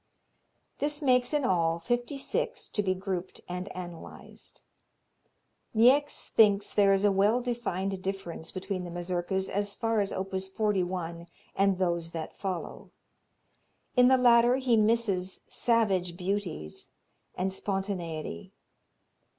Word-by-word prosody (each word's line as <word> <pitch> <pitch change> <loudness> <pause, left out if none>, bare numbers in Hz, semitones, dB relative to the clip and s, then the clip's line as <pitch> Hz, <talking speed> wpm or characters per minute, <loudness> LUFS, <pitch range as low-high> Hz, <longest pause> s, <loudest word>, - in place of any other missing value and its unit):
This 290 0 -1
makes 250 -2 +3
in 295 -2 +1
all 165 -5 +2
fifty 240 - -2
six 450 - -2
to 210 - 0
be 185 -2 0
grouped 185 -1 -5
and 180 +2 -5
analyzed. 175 -2 -9 1.1
Niecks 270 +6 +4
thinks 205 -2 +4
there 200 -1 +5
is 195 +1 +3
a 205 - +5
well 205 +5 +3
defined 195 -6 -3
difference 190 -4 -5
between 185 0 -4
the 175 - -6
Mazurkas 175 +2 -2
as 205 +1 -2
far 225 -1 0
as 200 -1 0
op. 190 +1 -4
41 185 -3 -2 0.3
and 195 -1 +3
those 170 -2 -1
that 160 -2 -5
follow. 185 -4 -5 1.1
In 250 -1 +6
the 260 0 +6
latter 240 0 +5
he 260 -3 +2
misses 210 -4 +1
"savage 195 -7 +1
beauties" 180 - -4 0.5
and 190 +1 -1
spontaneity. 180 - -4
195 Hz, 125 wpm, -29 LUFS, 180-230 Hz, 1.1 s, In